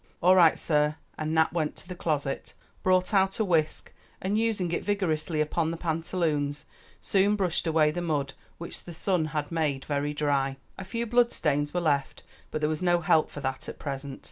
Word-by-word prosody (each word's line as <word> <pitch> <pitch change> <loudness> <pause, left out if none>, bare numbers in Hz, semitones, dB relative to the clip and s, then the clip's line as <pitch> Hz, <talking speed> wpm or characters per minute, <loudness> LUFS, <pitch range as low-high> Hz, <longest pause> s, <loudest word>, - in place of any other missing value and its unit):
"All 180 +2 +5
right, 170 -4 +6
sah," 150 -1 +1 0.2
and 155 0 -3
Nap 160 0 +3
went 160 -3 -1
to 180 - -8
a - - -11
closet, 150 -5 -2 0.3
brought 185 +1 +2
out 195 -1 +3
a 220 - +2
whisk, 160 -5 0 0.3
and 195 +2 -1
using 215 -6 +1
it 170 - -1
vigorously 165 -6 0
upon 160 +1 0
the 165 - -3
pantaloons, 160 -3 -1 0.3
soon 200 +1 +2
brushed 180 -4 0
away 155 -2 +3
the 175 - -3
mud, 145 -5 -1 0.2
which 170 - -5
the 175 - -8
sun 180 -2 +1
had 150 -1 -3
made 150 -5 -1
very 145 0 -1
dry. 140 -2 0 0.2
A 190 - -7
few 230 +5 -3
blood 240 +1 +3
stains 145 -1 0
were 175 - -1
left, 145 -4 0 0.3
but 155 - -3
there 150 - +2
was 155 +1 -2
no 175 -1 +3
help 155 -1 +3
for 145 - -8
that 130 -1 -3
at - - -8
present. 140 -1 -5
160 Hz, 195 wpm, -28 LUFS, 150-180 Hz, 0.3 s, right